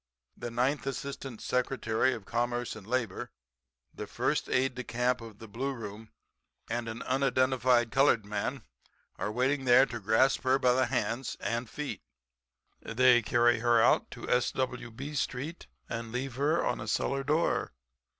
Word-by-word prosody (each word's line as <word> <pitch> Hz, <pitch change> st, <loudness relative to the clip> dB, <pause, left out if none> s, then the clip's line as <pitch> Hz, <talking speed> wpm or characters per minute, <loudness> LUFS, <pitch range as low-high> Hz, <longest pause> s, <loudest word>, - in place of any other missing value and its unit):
The 120 Hz, -, -6 dB
ninth 130 Hz, +4 st, 0 dB
Assistant 135 Hz, -3 st, -5 dB
Secretary 125 Hz, -1 st, +1 dB
of 105 Hz, -, -10 dB
Commerce 120 Hz, +1 st, -1 dB
and 105 Hz, -2 st, -11 dB
Labor, 120 Hz, -5 st, -2 dB, 0.6 s
the -, -, -7 dB
first -, -, -1 dB
aide 130 Hz, +1 st, +2 dB
de 125 Hz, 0 st, -5 dB
camp 125 Hz, +1 st, 0 dB
of 115 Hz, -3 st, -10 dB
the 115 Hz, -, -11 dB
Blue 130 Hz, +6 st, -3 dB
Room 110 Hz, -2 st, -8 dB, 0.6 s
and 115 Hz, 0 st, -2 dB
an 110 Hz, +1 st, -6 dB
unidentified 130 Hz, -2 st, +2 dB
colored 135 Hz, -6 st, +3 dB
man 105 Hz, +5 st, -3 dB, 0.5 s
are 105 Hz, -, -2 dB
waiting 130 Hz, +4 st, 0 dB
there 125 Hz, +2 st, +7 dB
to 120 Hz, -3 st, -6 dB
grasp 110 Hz, +6 st, +3 dB
her 130 Hz, 0 st, +3 dB
by 125 Hz, -2 st, +3 dB
the 130 Hz, +1 st, +2 dB
hands 115 Hz, +4 st, -2 dB
and 115 Hz, 0 st, -2 dB
feet. 150 Hz, -1 st, -5 dB, 0.8 s
They 125 Hz, +1 st, +4 dB
carry 120 Hz, +1 st, +3 dB
her 120 Hz, 0 st, +4 dB
out -, -, +4 dB
to -, -, -9 dB
S.W. 125 Hz, 0 st, 0 dB
B. 135 Hz, +6 st, -7 dB
street 145 Hz, +3 st, -3 dB, 0.2 s
and 115 Hz, -1 st, -5 dB
leave 130 Hz, +2 st, -3 dB
her 145 Hz, +6 st, +1 dB
on 125 Hz, -, -1 dB
a 110 Hz, -, -6 dB
cellar 135 Hz, +5 st, 0 dB
door. 150 Hz, +4 st, +1 dB
125 Hz, 160 wpm, -30 LUFS, 115-130 Hz, 0.8 s, there